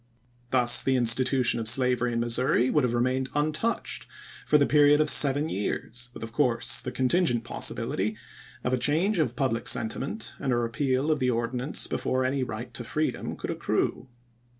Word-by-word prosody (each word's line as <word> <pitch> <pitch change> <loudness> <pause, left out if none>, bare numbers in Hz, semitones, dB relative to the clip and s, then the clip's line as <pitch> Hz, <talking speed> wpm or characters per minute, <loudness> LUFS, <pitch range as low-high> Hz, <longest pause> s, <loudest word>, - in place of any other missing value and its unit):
Thus 120 -2 +5
the 130 - 0
institution 125 0 +2
of 110 - -3
slavery 125 0 +2
in 115 - -2
Missouri 120 +1 +1
would 150 - +2
have 120 -1 0
remained 130 +2 -1
untouched 155 +10 -2 0.4
for 150 - +4
the 140 - +3
period 145 0 +4
of 155 -1 +5
seven 145 +2 +5
years, 120 0 -4
with 120 - -10
of 115 - -7
course 120 -2 0
the 125 0 -6
contingent 130 -2 +1
possibility 110 -2 -2 0.5
of 125 - -1
a 130 - +1
change 170 - +1
of 125 -6 -1
public 120 -3 -2
sentiment 135 - -2
and 135 - -2
a - - +2
repeal 130 +4 -1
of 155 - 0
the 125 - 0
ordinance 125 +4 -1
before 130 0 -2
any 135 +1 -1
right 120 0 -6
to 120 - -7
freedom 155 +6 -3
could - - -5
accrue. 130 - -2
130 Hz, 175 wpm, -26 LUFS, 120-145 Hz, 0.5 s, Thus